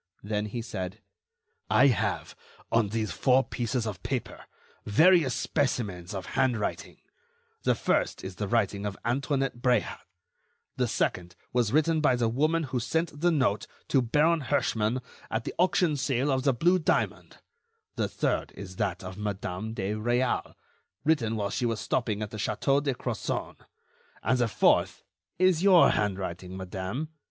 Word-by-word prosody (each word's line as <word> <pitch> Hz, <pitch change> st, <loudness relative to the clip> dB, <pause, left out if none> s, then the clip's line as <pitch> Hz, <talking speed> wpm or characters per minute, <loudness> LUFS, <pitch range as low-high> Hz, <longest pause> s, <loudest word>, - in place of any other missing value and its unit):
Then 105 Hz, 0 st, -2 dB
he 115 Hz, +3 st, -4 dB
said: 95 Hz, -2 st, -5 dB, 0.7 s
"I 135 Hz, -, +5 dB
have, 125 Hz, -8 st, 0 dB, 0.4 s
on 115 Hz, -3 st, +3 dB
these 110 Hz, 0 st, -2 dB
four 130 Hz, 0 st, +3 dB
pieces 120 Hz, -2 st, -2 dB
of 100 Hz, -4 st, -5 dB
paper, -, -, -4 dB, 0.4 s
various 155 Hz, -, +4 dB
specimens 100 Hz, -11 st, -1 dB
of 95 Hz, -2 st, -4 dB
handwriting; 120 Hz, -5 st, -1 dB, 0.6 s
the -, -, +2 dB
first -, -, 0 dB
is 95 Hz, -1 st, -7 dB
the 105 Hz, -, -2 dB
writing 105 Hz, -2 st, 0 dB
of 100 Hz, -, -5 dB
Antoinette 135 Hz, +1 st, 0 dB
Bréhat; 125 Hz, -3 st, +1 dB, 0.8 s
the -, -, +1 dB
second 85 Hz, -1 st, -1 dB, 0.2 s
was 120 Hz, -3 st, +2 dB
written 155 Hz, +2 st, +3 dB
by 130 Hz, -4 st, +4 dB
the 120 Hz, -2 st, +1 dB
woman 155 Hz, +7 st, +1 dB
who 130 Hz, -3 st, -2 dB
sent 155 Hz, +5 st, -2 dB
the 175 Hz, -, +4 dB
note 130 Hz, -10 st, +1 dB, 0.2 s
to 135 Hz, -, +4 dB
Baron 150 Hz, +7 st, +2 dB
Herschmann 115 Hz, -1 st, 0 dB, 0.3 s
at 110 Hz, 0 st, -2 dB
the -, -, -5 dB
auction 180 Hz, -3 st, +3 dB
sale 135 Hz, +1 st, 0 dB
of 130 Hz, -1 st, +1 dB
the 135 Hz, 0 st, +2 dB
blue 175 Hz, +8 st, +3 dB
diamond; 160 Hz, -, -1 dB, 0.6 s
the -, -, 0 dB
third -, -, -1 dB
is 95 Hz, -2 st, -9 dB
that 90 Hz, +1 st, -2 dB
of 95 Hz, +2 st, -8 dB
Madame 105 Hz, +1 st, -4 dB
de 100 Hz, -1 st, -2 dB
Réal, 120 Hz, +4 st, 0 dB, 0.5 s
written 130 Hz, -8 st, +2 dB
while 100 Hz, -2 st, -2 dB
she 125 Hz, +1 st, 0 dB
was 115 Hz, -2 st, -1 dB
stopping 110 Hz, -4 st, -1 dB
at 105 Hz, -, -6 dB
the 110 Hz, -, -6 dB
Château 135 Hz, +7 st, +1 dB
de 140 Hz, -3 st, -1 dB
Crozon; -, -, -3 dB, 0.7 s
and 125 Hz, +4 st, +2 dB
the 120 Hz, -, +3 dB
fourth 110 Hz, -, +2 dB, 0.3 s
is 185 Hz, -2 st, +3 dB
your 190 Hz, -3 st, +7 dB
handwriting, 95 Hz, -2 st, -2 dB
madame 95 Hz, +10 st, -4 dB
120 Hz, 155 wpm, -28 LUFS, 105-140 Hz, 0.8 s, your